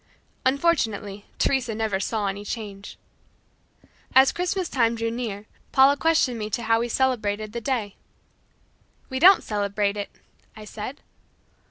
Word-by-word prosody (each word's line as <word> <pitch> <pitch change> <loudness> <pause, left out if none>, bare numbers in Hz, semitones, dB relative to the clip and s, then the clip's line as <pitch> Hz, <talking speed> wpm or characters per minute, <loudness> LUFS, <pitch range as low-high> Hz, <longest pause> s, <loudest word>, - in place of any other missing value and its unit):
Unfortunately 225 -9 0
Teresa 255 -5 0
never 215 -3 -1
saw 210 +2 -2
any 200 +1 -3
change. 205 -2 -7 1.2
As 265 0 +7
Christmas 360 0 -2
time 235 -5 +1
drew 230 0 -2
near, 220 -4 -5 0.3
Paula 270 +1 +6
questioned 290 -6 +1
me 210 - -3
as 215 - -13
to 240 - -1
how 225 0 +2
we 240 +1 -2
celebrated 215 -5 -1
that 235 -1 -5
day. 225 -7 -2 1.1
"We 260 - -2
don't 370 +5 +7
celebrate 205 -1 -1
it," 205 - -4 0.5
I 215 - -10
said. 220 +7 -7
225 Hz, 140 wpm, -24 LUFS, 205-265 Hz, 1.2 s, As